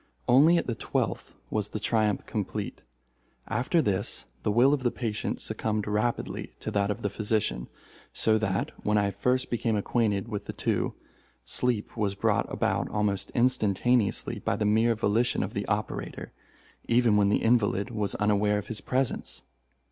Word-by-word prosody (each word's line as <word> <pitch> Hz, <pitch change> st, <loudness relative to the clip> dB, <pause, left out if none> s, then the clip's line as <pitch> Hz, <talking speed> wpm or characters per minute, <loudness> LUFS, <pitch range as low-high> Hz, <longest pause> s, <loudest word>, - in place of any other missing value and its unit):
Only 150 Hz, +8 st, +6 dB
at -, -, 0 dB
the 120 Hz, -, -1 dB
twelfth -, -, -3 dB, 0.2 s
was 105 Hz, -1 st, -1 dB
the 105 Hz, -, -4 dB
triumph 110 Hz, -2 st, +1 dB
complete. -, -, -4 dB, 0.7 s
After 125 Hz, +9 st, +1 dB
this 100 Hz, 0 st, 0 dB, 0.2 s
the -, -, -1 dB
will 125 Hz, +6 st, +5 dB
of 145 Hz, -, 0 dB
the 125 Hz, -, +2 dB
patient 115 Hz, -3 st, -3 dB
succumbed 110 Hz, -1 st, -2 dB
rapidly 105 Hz, +3 st, -2 dB
to -, -, -4 dB
that 100 Hz, 0 st, +1 dB
of 105 Hz, -, -3 dB
the 100 Hz, -, +1 dB
physician, 105 Hz, -, -1 dB, 0.4 s
so 110 Hz, -1 st, +2 dB
that, 100 Hz, -3 st, -1 dB
when 105 Hz, 0 st, +2 dB
I 100 Hz, -1 st, +2 dB
first 125 Hz, +6 st, 0 dB
became 115 Hz, -2 st, 0 dB
acquainted 105 Hz, -1 st, 0 dB
with 105 Hz, -3 st, -5 dB
the -, -, -5 dB
two, -, -, -1 dB, 0.5 s
sleep 120 Hz, -4 st, -1 dB
was 105 Hz, -3 st, -1 dB
brought -, -, +1 dB
about -, -, 0 dB
almost 105 Hz, -2 st, -1 dB
instantaneously 120 Hz, -2 st, +2 dB
by -, -, -1 dB
the 105 Hz, -, -1 dB
mere 110 Hz, +3 st, +3 dB
volition 110 Hz, +3 st, +1 dB
of -, -, -5 dB
the -, -, -3 dB
operator, -, -, -3 dB, 0.6 s
even 115 Hz, -2 st, +4 dB
when 100 Hz, -1 st, +4 dB
the 105 Hz, -, +1 dB
invalid 115 Hz, -3 st, +2 dB
was 105 Hz, -3 st, -1 dB
unaware 105 Hz, 0 st, +2 dB
of 105 Hz, -, -5 dB
his 115 Hz, -, -4 dB
presence. 130 Hz, 0 st, -2 dB
110 Hz, 165 wpm, -28 LUFS, 105-120 Hz, 0.7 s, Only